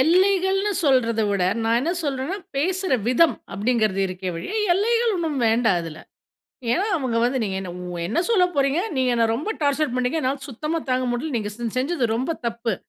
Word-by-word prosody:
எல்லைகள்னு 380 +5 +3
சொல்றதை 230 -5 +3
விட, 200 -2 0 0.2
நான் 230 +1 +3
என்ன 325 +7 0
சொல்றேன்னா 280 +6 -2 0.2
பேசுற 370 +4 0 0.2
விதம். 325 +6 +4 0.2
அப்படிங்கிறது 215 -2 +1
இருக்கே 185 0 -4
ஒழிய, 170 - -6 0.2
எல்லைகள் 460 +4 +2
ஒண்ணும் 320 -5 -2
வேண்டாம் 225 -4 +3
இதில. 160 -2 -8 0.7
ஏன்னா, 380 +8 +1
அவங்க 255 -5 -1
வந்து 255 +2 +1
நீங்க 195 -2 -2
என்ன 185 - -6 0.4
என்ன 230 - 0
சொல்ல 405 -6 +4
போறீங்க, 275 +2 +2 0.2
நீங்க 260 -1 +2
என்னை 230 -1 +3
ரொம்ப 305 - -4
டார்ச்சர் 285 -2 +1
பண்ணீங்க. 255 +5 0
என்னால 270 +2 -1
சுத்தமாக 305 +5 -3
தாங்க 255 0 +1
முடியல. 270 +4 -3
நீங்க 210 -1 -3
செ 240 +1 -5
செஞ்சது 265 +1 0
ரொம்ப 260 +8 -1
தப்பு. 230 -1 -1
260 Hz, 170 wpm, -23 LUFS, 230-335 Hz, 0.7 s, விதம்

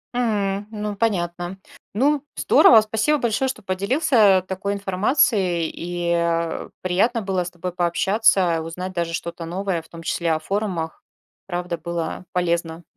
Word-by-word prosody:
М, 205 -4 0
ну, 210 -1 -4
понятно. 175 -4 -1 0.4
Ну, 285 +5 +2
здорово, 225 -2 +6
спасибо 220 +8 +1
большое, 240 +2 0
что 255 -5 -5
поделился, 205 - +3
а, - - +1
такой 190 +2 -3
информацией, 195 - +1
и, 175 0 -2
а, 170 -1 -1
приятно 210 +6 +1
было 190 -2 0
с 175 - -6
тобой 180 +1 -5
пообщаться, 180 0 +2
узнать 180 +3 -6
даже 170 -2 -2
что-то 170 0 -5
новое, 180 0 -2
в 160 - -22
том 165 0 -10
числе 170 0 -1
о 155 - 0
форумах. 180 -2 -3 0.5
Правда 175 -2 -3
было 170 +1 -4
полезно. 170 -2 -1
185 Hz, 145 wpm, -22 LUFS, 170-210 Hz, 0.5 s, здорово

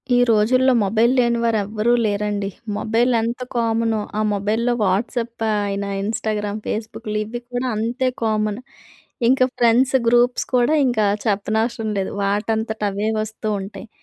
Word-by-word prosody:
ఈ - - +4
రోజుల్లో 255 +4 +4
మొబైల్ 220 +4 +2
లేని 235 -1 +2
వారు 230 -2 +2
ఎవ్వరూ 215 +3 0
లేరండి. 205 -1 -1 0.3
మొబైల్ 230 +4 +1
ఎంత 235 +2 -3
కామనో, 225 -1 +1 0.2
ఆ - - +2
మొబైల్‌లో 220 +4 0
వాట్సాప్ 230 +4 -1 0.2
అయిన, 200 0 -2 0.2
ఇన్‌స్టాగ్రామ్, 215 -1 -2
ఫేస్‌బుక్‌లు 215 0 -4
ఇవి 225 +3 -6
కూడా 245 +1 -2
అంతే 235 +4 -1 0.2
కామన్. 215 -1 0 0.7
ఇంకా 255 +1 +4
ఫ్రెండ్స్ 245 +3 +4
గ్రూప్స్ 240 +1 +3
కూడా 245 +4 +3
ఇంకా 235 -4 +1 0.2
చెప్పనవసరం 220 +2 0
లేదు. 195 - -2
వాటంతట 220 +2 -1
అవే 205 +2 -1
వస్తూ 215 0 -5
ఉంటాయి. 195 +4 -9
220 Hz, 135 wpm, -21 LUFS, 210-235 Hz, 0.7 s, ఈ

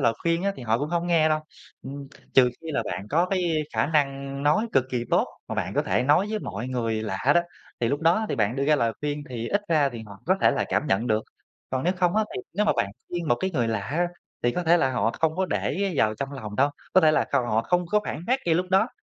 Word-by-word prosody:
lời 115 - +3
khuyên 170 +1 +1
á, 200 - +1
thì 130 - -8
họ 115 0 +1
cũng 145 +3 -2
hông 170 +1 -1
nghe 165 -3 +4
đâu, 155 0 +1 0.4
ừm, 140 0 -8 0.3
trừ 125 -2 +7
khi 160 - -5
là - - 0
bạn 90 +3 -5
có 170 +4 +3
cái 175 -5 0
khả 110 +3 +2
năng 140 -2 -1
nói 155 +10 +3
cực 130 - +3
kỳ 120 -2 -1
tốt - - +3 0.2
mà - - -3
bạn - - -2
có - - +2
thể - - +1
nói 150 +9 +3
với 215 - -1
mọi 110 - -5
người 115 -3 -1
lạ 95 -3 -3 0.2
đó, 175 - +6 0.4
thì 115 - +2
lúc 145 +4 -1
đó 175 +7 +3
thì - - -1
bạn 110 +4 +1
đưa 140 - 0
ra 150 +1 +4
lời 115 -4 +1
khuyên 150 -1 -2
thì 120 -2 -4
ít 205 +1 +1
ra 150 -4 +3
thì 120 -4 -8
họ 100 -1 -12
có 185 +2 +3
thể - - +5
là - - 0
cảm 150 - 0
nhận 110 +2 +1
được. 110 -1 +1 0.5
Còn 130 +2 -1
nếu 180 - +3
không 180 +2 +1
á, 220 - +3
thì 125 - -4
nếu 210 - +2
mà - - +4
bạn 100 - 0 0.2
khuyên 170 -2 -3
một 120 - +5
cái 190 - 0
người 120 -9 0
lạ 110 -3 -1
á, 165 - -1 0.4
thì 120 - +3
có 180 - -2
thể 170 +1 +5
là 135 -6 +2
họ 115 -2 +1
không 160 +1 +1
có 190 0 +1
để 195 0 -1
vào 110 -3 +2
trong 140 +5 -5
lòng 105 -6 -7
đâu, 140 +2 +3 0.2
có 185 - +6
thể 155 -2 +5
là - - +2
cầu 120 - +1
họ 110 0 +1
không 175 +7 +1
có 210 +4 +2
phản 160 +4 -5
bác 260 +2 +2
ngay 165 - +3
lúc 180 +2 +1
đó, 195 +5 +4
145 Hz, 285 wpm, -25 LUFS, 120-175 Hz, 0.5 s, trừ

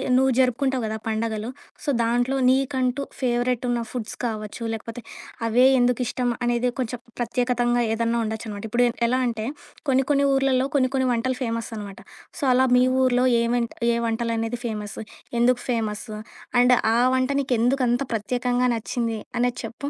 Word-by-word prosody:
నువ్వు 265 +1 +4
జరుపుకుంటావు 260 0 +1
గదా 220 - -3
పండగలు. 220 0 -2 0.3
సో, - - -2
దాంట్లో 245 +3 +1
నీకంటూ 260 0 +1 0.2
ఫేవరెట్ 245 0 0
ఉన్న 240 - +1
ఫుడ్స్ 235 -3 -5
కావచ్చు, 215 -1 -4
లేకపోతే 230 +2 -6 0.4
అవే 235 +3 +4
ఎందుకు 245 0 +2
ఇష్టం 245 0 -1
అనేది 240 +1 +1
కొంచెం 245 -1 -2 0.2
ప్రత్యేకతంగా 245 0 +1
ఏదన్నా 230 +1 0
ఉండొచ్చనమాట. 220 -2 -5
ఇప్పుడు 245 +2 +3 0.2
ఎలా 255 +2 +1
అంటే, 225 -2 -3 0.4
కొన్ని, 265 0 +3
కొన్ని 280 0 +3
ఊర్లలో 270 -1 +2
కొన్ని, 255 -2 +3
కొన్ని 260 -1 +2
వంటలు 250 +2 -1
ఫేమస్ 230 -1 -3
అనమాట. 200 -2 -8 0.4
సో, - - -5
అలా 260 +1 +4
మీ 250 - +5 0.2
ఊరిలో 250 0 +3 0.2
ఏ - - +2
వంట 235 -1 0 0.2
ఏ - - 0
వంటలనేవి 230 0 -2
ఫేమస్? 210 -3 -4 0.4
ఎందుకు 245 +1 +3
ఫేమస్సు? 215 -2 -2 0.4
అండ్ 250 0 +6 0.2
ఆ - - +3 0.2
వంట 255 0 +1
నీకెందుకంత 250 0 +1
ప్రత్యేకంగా 245 +3 0
నచ్చింది 230 0 -2 0.2
అనేది 245 0 0
చెప్పు? 235 +5 -6
245 Hz, 150 wpm, -24 LUFS, 230-255 Hz, 0.4 s, అండ్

